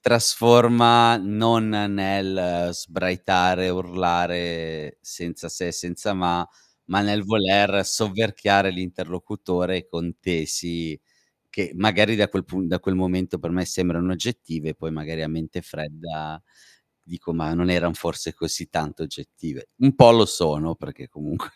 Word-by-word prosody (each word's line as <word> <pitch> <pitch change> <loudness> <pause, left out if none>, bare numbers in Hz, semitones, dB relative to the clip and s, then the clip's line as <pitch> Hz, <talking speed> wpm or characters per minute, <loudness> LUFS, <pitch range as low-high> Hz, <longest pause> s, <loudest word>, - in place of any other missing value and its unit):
trasforma 120 0 +6
non 110 +3 +1
nel 95 -4 -1
sbraitare, 90 +1 0
urlare, 85 -3 -3
senza 85 0 -9
se 90 - -5
e - - -6
senza 90 +5 -4
ma, 90 -2 -1 0.4
ma 95 +3 +1
nel 105 0 0
voler 100 -1 +3
sovverchiare 100 -1 +1
l'interlocutore 90 0 -4
con 85 0 -6
tesi 85 -2 -4 0.5
che, - - -4
magari, 110 +3 +3
da 105 -1 +3
quel 95 -1 -3
pun 90 -1 -4
da 90 - -1
quel 95 - -2
momento 90 -1 -2
per 85 - -6
me 90 +1 -1
sembrano 90 0 -1
oggettive, 80 -6 -5
poi 80 - -8
magari 80 +1 -7
a 80 - -4
mente 80 0 -6
fredda 75 +1 -9 0.7
dico: 85 0 -8
"Ma 80 -1 -3
non 90 +1 0
eran 85 -1 +1
forse - - -5
così - - -5
tanto 75 -2 -5
oggettive," - - -10
Un 135 0 +5
po' 120 - +11
lo 115 -2 +7
sono, 80 0 -1
perché - - -13
comunque 75 0 -8
90 Hz, 135 wpm, -22 LUFS, 85-100 Hz, 0.7 s, po